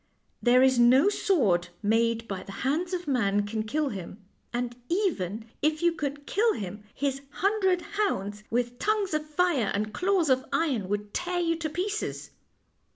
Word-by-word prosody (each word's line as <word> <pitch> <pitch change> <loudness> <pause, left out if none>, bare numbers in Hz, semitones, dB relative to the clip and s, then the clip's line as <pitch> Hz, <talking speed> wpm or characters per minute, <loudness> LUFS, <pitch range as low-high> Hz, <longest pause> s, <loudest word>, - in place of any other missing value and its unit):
" - - -46
There 250 +1 +5
is 260 -2 +4
no 260 +9 +6
sword 215 - +2 0.2
made 230 +2 +1
by 190 -2 -4
the 195 - -10
hands 320 +6 0
of 360 -2 -3
man 205 -7 +1
can 215 +1 -2
kill 290 +7 -1
him, 190 -3 -7 0.3
and 240 0 -2
even 225 - -1 0.2
if 305 +2 +1
you 345 - +5
could 290 -3 -4
kill 445 +6 +2
him, 205 +1 -6
his 275 -1 -1
hundred 380 +1 +1
hounds, 210 - -2
with 245 +1 -1
tongues 420 -4 0
of 305 0 0
fire 305 - +1
and 210 +1 -2
claws 365 -5 +2
of 260 0 +3
iron, 255 - 0
would 205 0 -3
tear 355 0 -1
you 330 -1 +1
to 320 -1 -3
pieces." 395 +7 -3
270 Hz, 170 wpm, -27 LUFS, 215-350 Hz, 0.3 s, no